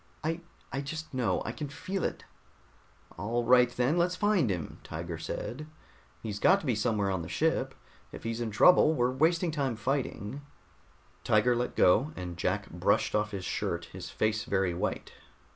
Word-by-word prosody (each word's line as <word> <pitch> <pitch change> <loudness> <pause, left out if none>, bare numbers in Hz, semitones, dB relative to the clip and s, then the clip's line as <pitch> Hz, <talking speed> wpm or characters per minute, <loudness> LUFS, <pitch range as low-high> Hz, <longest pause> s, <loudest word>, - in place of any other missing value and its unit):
"I 165 +2 -1 0.3
I 135 - -1
just 155 +2 -6
know. 115 -8 0
I - - -2
can 145 +4 -6
feel 190 +6 -4
it." - - -3 1.0
"All 120 +3 -1
right, 125 0 +6
then 125 +7 +1
let's 180 +1 +2
find 205 - +2
him," 90 -5 -4
Tiger 85 +1 -6
said. 125 - -5 0.6
"He's 105 -2 -4
got 190 - +5
to - - -9
be 125 - +2
somewhere 105 -2 0
on 95 -2 -1
the 80 - -7
ship. - - 0 0.4
If - - -9
he's 115 +1 -3
in 115 - -1
trouble, 155 - +6
we're 125 -2 +2
wasting 165 +5 +2
time 140 -6 -1
fighting." 130 0 -2 0.8
Tiger 115 +3 +3
let 120 +1 -2
go, 135 +12 +4
and 90 -1 -6
Jack - - -1
brushed - - +1
off 105 0 +1
his 100 -3 -5
shirt, - - -2
his - - -7
face 110 0 0
very 95 -3 0
white. 85 - -3
120 Hz, 175 wpm, -30 LUFS, 105-150 Hz, 1.0 s, right